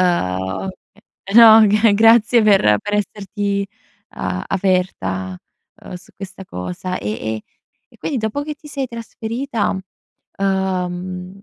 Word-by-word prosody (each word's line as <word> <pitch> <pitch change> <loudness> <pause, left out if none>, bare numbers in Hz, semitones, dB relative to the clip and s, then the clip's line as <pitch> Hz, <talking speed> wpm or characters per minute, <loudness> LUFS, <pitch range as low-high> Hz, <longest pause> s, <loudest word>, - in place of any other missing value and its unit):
ehm, 95 - 0 0.6
e 195 +2 -7
no, 225 -2 +9
g 210 +1 +4
grazie 225 +2 +5
per 190 - +4
per 205 +1 -3
esserti 200 0 -2 0.4
a 90 - -4
aperta, 95 - -1 0.5
uhm, - - -10
su 180 - -12
questa 195 -1 -9
cosa, 90 - -5
e 105 - -4
e 110 0 -4 0.5
e - - -21
quindi 290 - -3
dopo 220 +6 -2
che 300 0 -5
ti 300 - -17
sei 280 -3 -3
trasferita, 230 -1 -3 0.6
uhm 185 -1 -2
195 Hz, 125 wpm, -19 LUFS, 180-220 Hz, 0.6 s, no